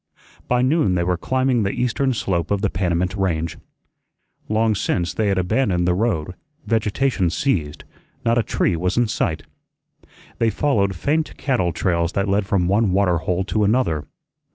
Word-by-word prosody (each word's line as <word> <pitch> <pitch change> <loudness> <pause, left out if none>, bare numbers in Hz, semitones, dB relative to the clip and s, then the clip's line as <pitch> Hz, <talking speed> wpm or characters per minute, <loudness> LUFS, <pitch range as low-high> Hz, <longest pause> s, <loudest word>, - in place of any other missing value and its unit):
By 125 0 +2
noon 130 - +2
they 85 - +1
were 90 +1 +1
climbing 130 +6 0
the 100 - 0
eastern 125 +4 0
slope 85 -7 -1
of 100 -1 0
the 100 - 0
Panamint 90 0 -1
Range. 85 -5 -1 0.9
Long 110 +1 +2
since 90 -3 -1
they 110 - 0
had 100 -1 +1
abandoned 90 -1 +1
the 90 - +3
road; 90 -5 -1 0.3
vegetation 110 -2 +1
ceased; 80 - -1 0.4
not 115 +1 +3
a - - +4
tree 90 - 0
was 90 +4 -1
in 120 -1 +3
sight. 80 -6 -1 1.0
They 115 - +3
followed 105 -7 +1
faint 155 - -1
cattle 125 -10 0
trails 85 0 0
that 100 +1 0
led 100 0 +1
from 95 -3 +1
one 100 0 +2
water 95 -3 +2
hole 90 +3 -1
to 105 +2 0
another. 100 - +1
100 Hz, 165 wpm, -21 LUFS, 90-115 Hz, 1.0 s, a